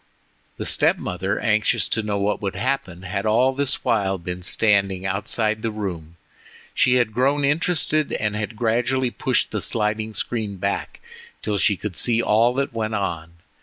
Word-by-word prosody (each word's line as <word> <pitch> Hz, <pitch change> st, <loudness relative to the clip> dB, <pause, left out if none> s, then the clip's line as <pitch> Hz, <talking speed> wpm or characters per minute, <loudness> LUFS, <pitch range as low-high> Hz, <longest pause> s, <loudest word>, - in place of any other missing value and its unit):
The -, -, -4 dB
step -, -, +3 dB
mother, 95 Hz, +3 st, -2 dB
anxious 110 Hz, -1 st, +2 dB
to 110 Hz, -, +1 dB
know 105 Hz, -1 st, -2 dB
what 100 Hz, +1 st, 0 dB
would 100 Hz, -1 st, -3 dB
happen, 115 Hz, -5 st, -2 dB
had 100 Hz, +1 st, -3 dB
all 125 Hz, +5 st, +3 dB
this 140 Hz, 0 st, -1 dB
while 100 Hz, -6 st, +1 dB
been 90 Hz, +1 st, -6 dB
standing 100 Hz, -1 st, +2 dB
outside 105 Hz, +3 st, 0 dB
the 115 Hz, -, -1 dB
room. 90 Hz, -6 st, -5 dB, 0.6 s
She 125 Hz, -, +3 dB
had 120 Hz, -3 st, +2 dB
grown 140 Hz, +4 st, +2 dB
interested, 155 Hz, 0 st, +1 dB
and 105 Hz, -1 st, -1 dB
had 105 Hz, +1 st, -4 dB
gradually 120 Hz, +3 st, +1 dB
pushed 130 Hz, 0 st, 0 dB
the 105 Hz, -, -2 dB
sliding 110 Hz, 0 st, -1 dB
screen 110 Hz, -5 st, -3 dB
back 100 Hz, +2 st, -3 dB, 0.4 s
till 105 Hz, -2 st, -1 dB
she 105 Hz, -2 st, +3 dB
could 100 Hz, 0 st, -5 dB
see 115 Hz, +4 st, +2 dB
all 115 Hz, +1 st, +3 dB
that 140 Hz, -1 st, -1 dB
went 110 Hz, -1 st, -2 dB
on. 85 Hz, -5 st, -3 dB
110 Hz, 165 wpm, -22 LUFS, 100-120 Hz, 0.6 s, step